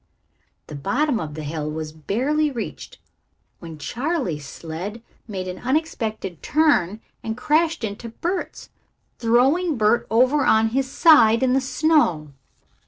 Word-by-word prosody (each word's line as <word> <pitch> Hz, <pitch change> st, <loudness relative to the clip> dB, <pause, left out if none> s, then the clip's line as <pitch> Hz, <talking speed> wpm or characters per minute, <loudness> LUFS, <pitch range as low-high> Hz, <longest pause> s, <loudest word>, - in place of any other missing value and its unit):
The -, -, -11 dB
bottom 240 Hz, -, 0 dB
of 150 Hz, -4 st, -6 dB
the 155 Hz, -, -6 dB
hill 150 Hz, 0 st, -4 dB
was 155 Hz, 0 st, -5 dB
barely 260 Hz, -, 0 dB
reached 275 Hz, -, -7 dB, 0.6 s
when 165 Hz, -2 st, -9 dB
Charley's 230 Hz, -, -3 dB
sled 180 Hz, +10 st, -7 dB, 0.2 s
made 190 Hz, -4 st, -5 dB
an 180 Hz, 0 st, -6 dB
unexpected 230 Hz, -, -2 dB
turn 225 Hz, -, +2 dB, 0.2 s
and 220 Hz, 0 st, -4 dB
crashed 310 Hz, +2 st, +1 dB
into 220 Hz, +2 st, -5 dB
Bert's, 345 Hz, +11 st, -5 dB, 0.5 s
throwing 265 Hz, +8 st, +2 dB
Bert 215 Hz, +2 st, +2 dB
over 255 Hz, +6 st, +3 dB
on 220 Hz, 0 st, +3 dB
his 265 Hz, +3 st, -1 dB
side 265 Hz, -7 st, +5 dB
in 255 Hz, -1 st, +3 dB
the 270 Hz, -, +2 dB
snow. 260 Hz, -, +1 dB
230 Hz, 130 wpm, -22 LUFS, 180-290 Hz, 0.6 s, side